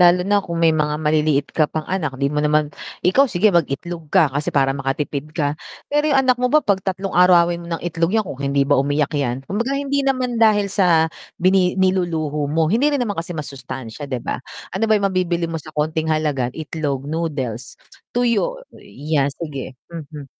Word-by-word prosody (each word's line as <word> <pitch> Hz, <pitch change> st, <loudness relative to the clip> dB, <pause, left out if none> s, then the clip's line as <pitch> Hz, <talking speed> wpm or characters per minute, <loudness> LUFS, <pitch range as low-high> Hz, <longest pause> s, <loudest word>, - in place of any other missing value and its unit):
Lalo 175 Hz, 0 st, +6 dB
na 205 Hz, +1 st, +3 dB
kung 170 Hz, -3 st, -5 dB
may 165 Hz, -1 st, +4 dB
mga 150 Hz, -1 st, 0 dB
maliliit 150 Hz, -2 st, +1 dB
ka 155 Hz, -2 st, +2 dB
pang 155 Hz, -1 st, -4 dB
anak 155 Hz, -8 st, -2 dB
di 140 Hz, +2 st, -1 dB
mo 150 Hz, -, 0 dB
naman 150 Hz, 0 st, +1 dB, 0.3 s
ikaw 260 Hz, +10 st, +4 dB
sige 205 Hz, +1 st, +3 dB
mag-itlog 165 Hz, 0 st, -1 dB
ka 160 Hz, -5 st, +3 dB
kasi 145 Hz, +2 st, -2 dB
para 135 Hz, -1 st, +2 dB
makatipid 140 Hz, +1 st, -3 dB
ka 145 Hz, -3 st, +1 dB, 0.4 s
pero 295 Hz, +1 st, +2 dB
yung 275 Hz, -2 st, +4 dB
anak 255 Hz, -1 st, +2 dB
mo 250 Hz, -, +2 dB
ba 305 Hz, +4 st, +4 dB
'pag 195 Hz, -2 st, +2 dB
tatlong 190 Hz, +1 st, -3 dB
arawin 175 Hz, -1 st, +4 dB
mo 170 Hz, -, -10 dB
ng -, -, -13 dB
itlog 170 Hz, +2 st, 0 dB
yan 220 Hz, -, +2 dB
kung 140 Hz, -8 st, -7 dB
hindi 140 Hz, 0 st, +1 dB
ba 145 Hz, -1 st, +3 dB
umiyak 145 Hz, +1 st, 0 dB
yan 135 Hz, -3 st, -1 dB
kumbaga 230 Hz, -, -2 dB
hindi 280 Hz, 0 st, 0 dB
naman 255 Hz, -3 st, 0 dB
dahil 205 Hz, -3 st, +4 dB
sa 175 Hz, -5 st, +4 dB, 0.3 s
bini 185 Hz, 0 st, +3 dB
niluluho 170 Hz, -6 st, 0 dB
mo 160 Hz, +2 st, +2 dB
hindi 245 Hz, +7 st, +3 dB
rin -, -, -3 dB
naman 205 Hz, -3 st, -3 dB
kasi 175 Hz, +1 st, -7 dB
masustansya, 135 Hz, -2 st, -7 dB
di 130 Hz, -2 st, -2 dB
ba? -, -, -2 dB, 0.3 s
Ano 225 Hz, -, 0 dB
ba 215 Hz, -, +5 dB
yung 200 Hz, -, -1 dB
mabibili 175 Hz, -2 st, 0 dB
mo 165 Hz, -, -3 dB
sa 155 Hz, -, -13 dB
konting 155 Hz, +1 st, 0 dB
halaga 150 Hz, -5 st, 0 dB
itlog, 145 Hz, -3 st, -3 dB
noodles, 140 Hz, -7 st, -4 dB, 0.4 s
tuyo 245 Hz, -, +1 dB, 0.2 s
ya 145 Hz, -1 st, -1 dB
sige 140 Hz, -5 st, -6 dB, 0.2 s
hmm 165 Hz, -3 st, -7 dB
hmm. 150 Hz, -3 st, -9 dB
160 Hz, 195 wpm, -20 LUFS, 145-190 Hz, 0.4 s, Lalo